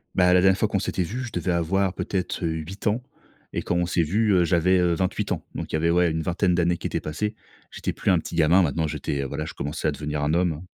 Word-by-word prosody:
Bah, 90 -1 +5
la 90 - +5
dernière 95 0 +4
fois 110 - +2
qu'on 100 - 0
s'était 95 -1 -1
vus, 120 +9 -4
je 115 - -9
devais 90 0 -1
avoir 90 +3 +1
peut-être 95 -2 -3
8 80 +4 -4
ans. 110 +4 +1 0.5
Et - - -1
quand 85 - -2
on 90 0 +2
s'est 85 0 +1
vus, 105 +7 +1
heu, 90 -2 +4
j'avais, 90 +2 +3
heu, 90 -1 +3
28 90 +2 -1
ans. - - -2
Donc - - -5
il - - 0
y - - +3
avait, 85 +2 +1
ouais, 85 -1 +3
une 80 - -1
vingtaine 90 +3 +1
d'années 85 0 +2
qui - - -4
étaient - - -2
passées. 105 +8 -3 0.4
J'étais - - -3
plus - - 0
un 90 - +4
petit 85 - -7
gamin, 85 +3 +5
maintenant, 80 0 0
j'étais 75 -2 -3
voilà, 75 +3 -4
je - - -7
commençais 75 +2 -3
à - - +2
devenir 75 0 -4
un 75 +1 +1
homme. 85 -2 0
85 Hz, 265 wpm, -24 LUFS, 80-95 Hz, 0.5 s, Bah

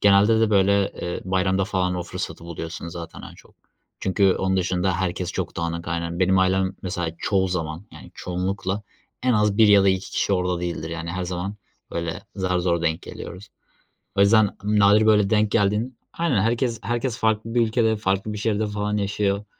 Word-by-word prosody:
Genelde 105 +3 +5
de 110 - +3
böyle, 100 0 +3
ııı, 85 - -3
bayramda 95 +1 +1
falan 90 -2 0
o 90 - -2
fırsatı 85 -1 -6
buluyorsun 85 0 -6
zaten 85 -1 -8
en - - -10
çok - - -19 0.5
çünkü 95 0 +3
onun 95 0 0
dışında 95 +1 +1
herkes 90 0 -2
çok - - -4
dağınık. 85 +1 -3
Aynen, 85 0 -3
benim 95 +1 +4
ailem 95 0 +2
mesela 90 -3 -2
çoğu 95 -2 +1
zaman 80 +1 -4
yani - - -12
çoğunlukla 95 +2 -3 0.4
en 125 0 +3
az 105 -2 +2
1 110 -2 +7
ya 100 -1 +7
da - - +5
2 95 0 0
kişi - - 0
orada 90 -2 0
değildir. 85 -2 -4
Yani 85 0 -4
her 90 +1 -3
zaman 90 +3 -4 0.4
böyle 85 -1 -3
zar 90 -2 0
zor 85 -1 0
denk 80 -1 0
geliyoruz. 95 +3 -9 0.7
O 100 - +1
yüzden 105 0 +4
nadir 105 +1 +4
böyle 105 -2 +4
denk 105 -1 +3
geldin 105 +4 +1 0.2
Aynen, 160 - +2
herkes 115 +1 0
herkes 120 +2 -2
farklı 110 +1 0
bir 120 - +4
ülkede, 110 -1 +2
farklı 100 0 -1
bir 105 - -5
şehirde 110 0 0
falan 105 0 -2
yaşıyor, 100 0 0
95 Hz, 185 wpm, -23 LUFS, 90-105 Hz, 0.7 s, 1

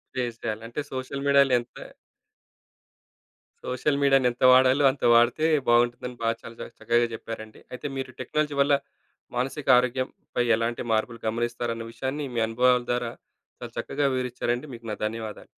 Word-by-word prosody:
Face 120 -3 -2
జెయ్యాలి, 110 +1 -3
అంటే 120 +6 -4
social 130 +1 -4
మీడియాలో 140 -2 +5
ఎంత 120 0 -12 1.9
సోషల్ 140 +3 0
మీడియాని 135 -2 +4
ఎంత 120 - -16
వాడాలో 130 +2 +5
అంత 135 - -12
వాడితే 120 +6 +4 0.2
బావుంటుందని 120 +1 +2
బాగా 115 0 +1
చాలా 115 - -10
చ - - -4 0.2
చక్కగా 120 +1 +2
చెప్పారండి. 110 -1 -8
అయితే 125 - -5
మీరు 135 -1 -4
టెక్నాలజీ 150 +3 -1
వల్ల 145 +1 +3 0.6
మానసిక 135 +4 -3
ఆరోగ్యంపై 125 0 -1
ఎలాంటి 115 +1 -2
మార్పులు 115 +1 0
గమనిస్తారన్న 115 0 -2
విషయాన్ని 135 +5 -4
మీ 115 - +1
అనుభవాల 125 +2 +3
ద్వారా 120 -1 -1 0.5
చాలా - - -8
చక్కగా 145 -1 -1
వివరిచ్చారండి 125 +1 -2
మీకు 115 0 -12
నా - - -2
ధన్యవాదాలు. 110 -1 -5
125 Hz, 140 wpm, -26 LUFS, 115-130 Hz, 1.9 s, మీడియాలో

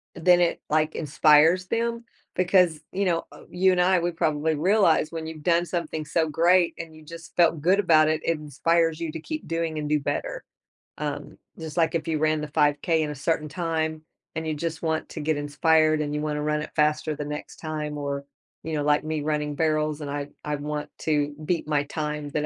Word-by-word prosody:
eh, 165 - -9
then 180 -1 +6
it, 175 - +1
like, 155 0 +1
inspires 155 +4 +4
them 235 0 -1 0.3
because, 180 -3 +3
you 200 +2 0
know, 170 -2 0
uh - - -13
you 185 +1 +3
and 180 - +2
I, 185 0 +4
we 175 +1 -1
probably 160 -2 0
realize 170 -1 +3
when 160 -1 -5
you've 155 -2 -8
done 170 0 +3
something 165 -3 -3
so 160 +1 0
great 175 +3 +3
and 160 -1 -7
you 155 - -14
just 165 +1 -11
felt 165 -2 +4
good 185 +6 +3
about 155 -5 +5
it. 155 0 0
It 165 -2 +1
inspires 165 +3 +1
you 165 - -2
to 160 - -6
keep 310 - -6
doing 165 -1 -2
and 150 - -3
do 150 0 +2
better, - - -3 0.5
um, - - -5 0.2
just 160 -1 -7
like 165 0 +2
if 165 - -2
you 155 - 0
ran 155 0 +1
the 150 - -4
5K 150 +2 +2
in 150 - -1
a 150 - -6
certain 150 +2 -1
time 160 -2 -2 0.3
and 160 0 -3
you 155 - 0
just 160 +1 -4
want 160 -1 -1
to - - -7
get 155 0 0
inspired, 155 +1 +2
and 145 -1 -3
you 150 - -1
wanna 150 -1 -2
run 150 0 0
it - - -7
faster 150 0 +1
the 150 - -5
next 150 0 -6
time 150 -2 -4
or, 140 -1 -3 0.4
you 160 - -4
know, 150 -1 0
like 150 0 +2
me 155 -1 -2
running 150 -1 -1
barrels 155 -1 0
and 145 -1 -5
I 145 0 -4
I 150 0 -2
want 150 +1 -4
to 145 -2 0
beat 165 -2 -1
my 145 -2 +1
time 150 -1 -4
that 150 0 -1
155 Hz, 220 wpm, -25 LUFS, 150-165 Hz, 0.5 s, then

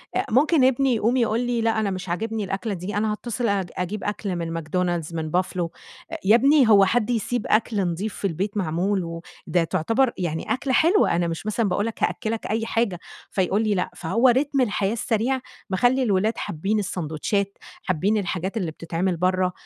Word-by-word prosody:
أ - - +1
ممكن 285 +3 +4
ابني 260 -1 +3
يقوم 230 +4 +1
يقول 230 -1 +1
لي: 245 -1 0
"لأ 225 -1 +1
أنا 205 -2 0
مش 185 -1 -5
عاجبني 220 +4 -2
الأكلة 195 +2 -3
دي، 190 +3 -5
أنا 215 0 +1
هاتصل 235 +2 -3
أج 195 -4 0
أجيب 190 +3 -3
أكل 205 -2 -3
من 165 -1 -3
McDonald's، 170 0 -2
من 155 -1 -3
buffalo." 180 -1 0 0.4
آآ - - -3
يا 210 +4 +7
ابني 275 -1 +5
هو 200 -2 +7
حد 225 +2 +1
يسيب 240 0 -1
أكل 220 0 +1
نضيف 185 +4 -2
في 200 - -1
البيت 195 +4 -3
معمول، 185 +2 0 0.4
وده 175 -2 +2
تعتبر 225 +11 +1
يعني 170 +4 -2
أكلة 260 +1 -2
حلوة، 340 - +4
أنا 175 0 +1
مش 165 +4 -5
مثلًا 215 -1 0
باقول 205 +4 0
لك 230 - -4
هأكّلك 225 -1 -1
أي 225 +1 -1
حاجة 225 -6 0 0.3
فيقول 195 +3 +1
لي: 210 -2 +1
"لأ." 180 - -1
فهو 230 +9 +2
رتم 275 +2 +2
الحياة 205 -3 0
السريع 235 +3 0 0.3
مخلّي 245 +7 +2
الولاد 215 0 +1
حابين 195 +7 -1
السندوتشات، 190 +2 -2 0.3
حابين 190 +5 +1
الحاجات 190 +1 -2
اللي 180 -7 -2
بتتعمل 170 +3 -2
برا، 185 +1 +1
205 Hz, 185 wpm, -24 LUFS, 180-230 Hz, 0.4 s, يا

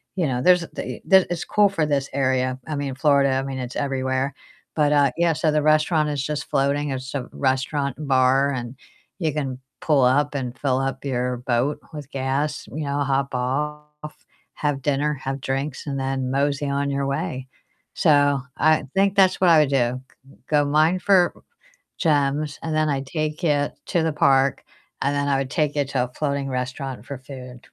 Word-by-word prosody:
you 175 -5 +1
know, 125 -1 -1
there's 180 -1 +5
the 170 - -6
the 190 -1 +6
It's 175 - -2
cool 205 -1 +3
for 165 -6 0
this 140 -2 0
area. 130 -1 0
I 155 - -3
mean, 140 -2 -3
Florida, 140 -1 +3
I 135 - +1
mean, 135 -1 -5
it's 125 -1 -6
everywhere. 135 0 -1 0.4
But 150 -2 +2
uh, 140 -3 +4
yeah, 170 -1 +3
so 155 +2 +1
the 150 0 +2
restaurant 155 0 +3
is 145 -2 -2
just 150 0 -3
floating, 140 +1 +1
it's 130 0 -5
a 130 - -4
restaurant 135 +1 -1
and 150 -2 -6
bar, 135 +2 +3
and 120 -1 -5 0.4
you 160 -3 0
can 135 -4 -3 0.2
pull 150 -4 +3
up 145 +3 +2
and 125 -2 -4
fill 130 -2 +1
up 135 0 -3
your 125 -1 -1
boat 125 +3 0
with 145 -2 -8
gas, 135 +2 -2
you 155 0 -3
know, 140 +1 -1
hop 135 0 -1
off, 150 +4 -4 0.3
have 145 -2 -1
dinner, 145 +2 0
have 135 +1 -4
drinks, 135 +2 -3
and 140 -1 -2
then 135 -1 -2
mosey 140 +1 0
on 140 0 -1
your 140 0 -1
way. 140 -2 -3 0.5
So 145 -2 +3 0.2
I 155 0 +3
think 195 +1 +3
that's 190 -2 +4
what 180 - +5
I 160 -2 +7
would 145 - +1
do, 130 -2 +1 0.5
go 145 -1 +3
mine 155 +5 +3
for 180 -2 +4 0.7
gems, 145 -1 +1
and 160 -1 -3
then 155 0 +2
I'd 135 -1 -2
take 155 +2 -3
it 145 -2 +1
to 170 - +1
the 160 - 0
park, 135 -2 +3 0.4
and 140 +1 +1
then 140 0 0
I 140 - +2
would 135 -1 -3
take 150 -3 0
it 140 -2 0
to 125 -3 +1
a 125 - -9
floating 140 -2 -1
restaurant 130 +1 -4
for 140 -2 -6
food. 130 -2 -10
140 Hz, 195 wpm, -23 LUFS, 135-150 Hz, 0.7 s, I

